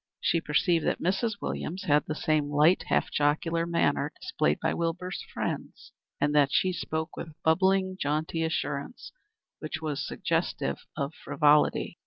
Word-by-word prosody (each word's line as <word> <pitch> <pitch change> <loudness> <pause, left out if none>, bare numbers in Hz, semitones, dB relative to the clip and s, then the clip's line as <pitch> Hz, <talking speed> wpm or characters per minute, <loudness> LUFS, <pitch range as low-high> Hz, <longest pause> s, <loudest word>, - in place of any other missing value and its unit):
She 165 - +1
perceived 165 +2 +2
that - - 0
Mrs. 195 +6 0
Williams 185 +5 -3
had 150 -2 +3
the 155 - -2
same 155 -2 +1
light, 150 +5 +4
half - - +1
jocular 165 +3 +1
manner 170 -1 +1
displayed 75 +1 0
by - - 0
Wilbur's 170 +2 -3
friends, - - -5 0.3
and 145 +1 +1
that 145 -2 +4
she 185 +5 +2
spoke 160 -1 -3
with 160 -2 -7
bubbling, 190 +3 +2
jaunty 155 +3 -1
assurance, 160 - -3 0.5
which 155 +1 -4
was 155 -3 -3
suggestive - - -2
of 140 +2 -2
frivolity. 150 -2 +2
160 Hz, 145 wpm, -28 LUFS, 150-175 Hz, 0.5 s, light